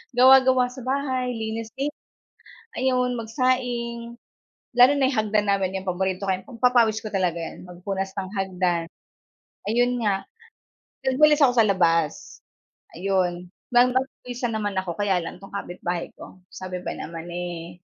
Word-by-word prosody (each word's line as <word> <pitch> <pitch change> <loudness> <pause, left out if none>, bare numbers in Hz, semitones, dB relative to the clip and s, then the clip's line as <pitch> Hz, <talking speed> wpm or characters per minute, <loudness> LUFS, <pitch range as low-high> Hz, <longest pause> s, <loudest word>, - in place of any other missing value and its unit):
gawa 260 +2 +8
gawa 255 -1 +3
sa 255 - -10
bahay 260 -2 -1
linis 225 0 -4
din 280 +2 -1 0.9
ayun 250 -1 +1
magsaing, 235 0 -2 0.6
lalo 250 +3 +8
na 270 -2 +2
yung 255 - -2
hagdan 210 -1 +1
namin 195 -1 0
yung - - -16
paborito 190 +1 -1
kay 190 0 -2
pagpapawis 235 -3 +2
ko 215 - -5
talaga 180 -4 0
yun, 165 - -8
magpunas 190 +2 -4
ng 190 -1 -4
hagdan 180 -3 0 0.8
ayun 245 +4 +2
nga, 195 -2 0 0.7
nag 265 0 0
walis 305 0 +6
ako 250 -3 +4
sa 225 - +6
labas, 165 -6 +1 0.6
ayon 180 -1 -1 0.2
pinagpawisan 250 -1 +1
naman 205 -3 -2
ako 185 -2 -2
kaya 195 -1 +1
lang 165 - -7
tong 195 - -11
kapitbahay 175 -2 -4
ko - - -12 0.2
sabi 185 -1 -5
ba - - -2
naman 165 0 -7
eh, 175 0 -6
215 Hz, 145 wpm, -24 LUFS, 185-250 Hz, 0.9 s, gawa